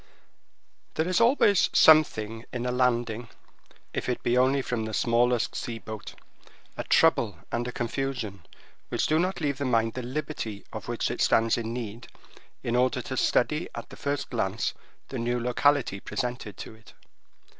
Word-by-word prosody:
There 160 - 0
is 185 +4 +2
always 230 -5 +4
something 115 -8 +5
in 125 -1 -3
a 125 - 0
landing, 120 -2 0 0.6
if - - -2
it 125 - -2
be 120 - +2
only 130 +2 +3
from 115 -3 -2
the 110 -1 -3
smallest 120 0 +2
sea 115 -1 -4
boat—a 110 0 -11
trouble - - +3
and 120 +1 -1
a - - -3
confusion 120 - -3 0.5
which - - 0
do 155 +1 +2
not 185 +3 0
leave 140 -3 -1
the 140 - -1
mind 115 -2 +2
the 130 - -4
liberty 125 -5 -5
of - - -6
which - - -1
it - - -3
stands 115 0 +4
in 115 -1 -3
need 115 -1 -6 0.6
in 120 - -1
order 125 +1 +2
to 130 - -4
study 150 +6 +1
at - - -7
the - - -9
first 145 -1 -3
glance 110 -3 -1 0.4
the 130 - -4
new 120 +1 0
locality 125 -2 +2
presented 120 -3 -4
to - - -8
it. 110 0 -18
125 Hz, 165 wpm, -27 LUFS, 115-135 Hz, 0.6 s, something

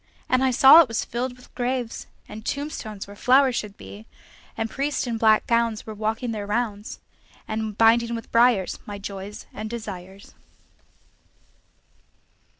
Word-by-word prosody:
And 255 +1 +2
I 265 - +3
saw 265 +6 +8
it 330 - +1
was 230 -1 -2
filled 245 +1 -4
with 250 - -19
graves, 245 -1 -3 0.2
And 215 +1 -9
tombstones 250 -8 -5
where 200 - -12
flowers 260 +3 +4
should 210 -3 -4
be; 215 +3 -12 0.5
And 225 - -1
priests 280 +5 -2
in 230 -2 -3
black 220 -1 +4
gowns 230 -2 0
were 220 - -7
walking 220 +3 -2
their 210 -2 -5
rounds, 210 -1 -3 0.5
And 215 -1 -4
binding 235 +1 +4
with 230 - -8
briars 230 -5 +3
my 205 -1 -6
joys 200 0 -8
and 215 0 -6
desires. 200 -4 -8
225 Hz, 150 wpm, -24 LUFS, 210-245 Hz, 0.5 s, saw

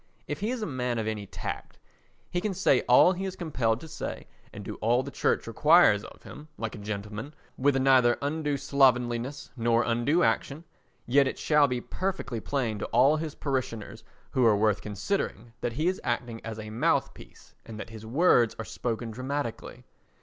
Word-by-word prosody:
If - - -4
he 210 +2 -1
is 245 -3 -2
a - - -1
man 125 - -2
of 110 - -2
any 105 -2 -4
tact, - - -6 0.5
he 175 - -1
can 200 -1 -2
say 175 -8 +3
all 125 +8 +7
he 190 +1 -5
is 190 -1 -4
compelled 125 -10 -1
to 160 - -9
say 155 - -6 0.3
and - - -9
do - - -6
all 120 +4 +2
the - - -7
Church - - 0
requires - - +5
of - - -13
him—like 150 -7 -8
a 115 - -8
gentleman, 105 +6 -6 0.2
with 140 +1 +2
neither 130 -2 +4
undue 145 0 -1
slovenliness 130 -2 +1
nor 115 -1 +2
undue 120 +9 +1
unction—yet 140 -2 -1
it - - -3
shall 150 -2 +4
be 125 -2 -2
perfectly 185 -11 -3
plain 115 -4 -2
to - - -3
all 135 +6 +4
his 155 -1 -5
parishioners 115 -6 -4 0.3
who 130 - +2
are 110 -3 +5
worth 105 -1 +2
considering 110 - -3
that 120 - -2
he 155 +7 0
is 185 +1 -1
acting 120 -1 -3
as 110 -1 -6
a 110 0 -7
mouthpiece 115 +3 -2
and 110 -1 -9
that 110 - -7
his 110 -1 -10
words 120 -1 +3
are 115 - -5
spoken 115 +3 -4
dramatically. 130 +1 -5
125 Hz, 180 wpm, -28 LUFS, 115-145 Hz, 0.5 s, all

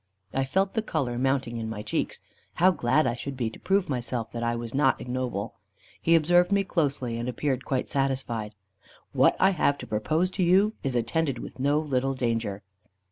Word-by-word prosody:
I 135 0 +1
felt 190 +8 0
the 220 - +1
colour 135 - -2
mounting 135 -2 0
in 110 -1 -4
my 105 -1 -5
cheeks. 105 - -2 0.4
How 185 +2 +5
glad 140 -2 +2
I 120 - +1
should 130 +3 -6
be 115 -3 -1
to - - -12
prove 195 0 +2
to 150 - -6
myself 120 -2 -3
that 115 - -5
I 120 0 0
was 115 -1 -5
not 135 -1 +3
ignoble. 125 -5 -3 0.5
He 165 - +4
observed 175 +3 +4
me 200 0 +3
closely, 140 -10 -1
and 120 +2 -2
appeared 130 +1 -2
quite 130 -2 -1
satisfied. 130 -6 -2 0.6
"What - - +4
I 190 - +5
have 145 -5 +1
to - - -8
propose 155 +12 0
to 185 - -1
you, 195 +5 +4
is 135 -2 -2
attended 130 +4 0
with 120 - -9
no 140 +3 +2
little 135 -3 0
danger." 115 -5 -2
135 Hz, 195 wpm, -27 LUFS, 120-160 Hz, 0.6 s, How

